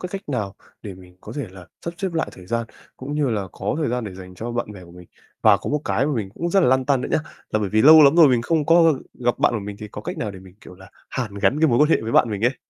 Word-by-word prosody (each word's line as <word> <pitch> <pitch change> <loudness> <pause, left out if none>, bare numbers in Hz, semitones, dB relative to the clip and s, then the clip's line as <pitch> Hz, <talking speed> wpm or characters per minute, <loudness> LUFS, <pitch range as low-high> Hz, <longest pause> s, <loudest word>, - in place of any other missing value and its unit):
cái 180 - -5
cách 195 -5 -7
nào 105 -8 -3 0.3
để 100 -3 -7
mình 90 -1 -17
có - - -10
thể 140 -6 -3
là 95 -2 -13 0.2
sắp 170 0 -5
xếp 190 -3 -3
lại 160 - -1
thời 90 -1 -14
gian 115 +2 -2 0.3
cũng 140 +3 -6
như 150 -3 0
là 100 -4 -2
có - - -3
thời 155 - -1
gian 125 0 -2
để 100 -3 -7
dành 90 -1 -11
cho 115 +6 -6
bạn 120 -3 -3
bè 95 -3 -12
của 85 - -16
mình. 90 -1 -14 0.3
Và 100 - +6
có - - -6
một 150 0 0
cái 135 +5 0
mà 150 - -1
mình 105 -5 -3
cũng 170 +1 -3
rất 195 +2 +4
là - - +3
lăn 130 +1 +2
tăn 135 -1 +1
nữa - - -4
nhá. - - +2 0.3
Là 110 - +1
bởi 100 - -1
vì 110 +2 +2
lâu 155 +2 +9
lắm 140 +4 +5
rồi 160 -4 +8
mình 120 -2 +2
không 155 +1 0
có 165 -1 +5 0.2
gặp 120 -1 -1
bạn - - +3
của 110 - -2
mình 100 0 -7
thì 105 -1 -8
có - - -8
cách 180 -1 -6
nào 105 -6 -3
để 95 - -10
mình, 95 -1 -16
kiểu 90 - -13
là, 95 +1 -16 0.2
hàn 110 -6 -4
gắn 135 +9 +1
cái 160 - +4
mối 120 -2 +2
quan 150 +1 +4
hệ - - +5
với 115 - -4
bạn 115 - +4
mình 105 +1 -4
ấy. 125 +1 +1
120 Hz, 330 wpm, -22 LUFS, 100-150 Hz, 0.3 s, lâu